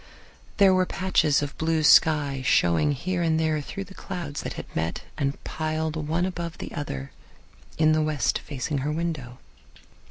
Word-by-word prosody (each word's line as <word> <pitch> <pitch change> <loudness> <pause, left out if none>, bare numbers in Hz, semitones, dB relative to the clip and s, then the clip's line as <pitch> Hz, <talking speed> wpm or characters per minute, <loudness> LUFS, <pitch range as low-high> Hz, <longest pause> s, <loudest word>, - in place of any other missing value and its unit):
There 195 -2 +6
were 185 -1 +2
patches 160 -6 +2
of 145 - -5
blue 160 0 +1
sky 150 -3 +5
showing 90 - +3
here 175 +6 -2
and 160 -1 +2
there 155 -1 +1
through 195 +7 -6
the 195 - -13
clouds 175 -7 -5
that - - -5
had - - -7
met 80 +1 -2
and 140 -1 -1
piled 155 0 -2
one 160 +3 -1
above 170 -2 -4
the - - -7
other 70 - -5 0.7
in 155 0 +4
the 155 0 +3
west 150 -6 0
facing 145 +1 -3
her 145 +3 -1
window. 155 -7 -3
155 Hz, 165 wpm, -26 LUFS, 145-170 Hz, 0.7 s, There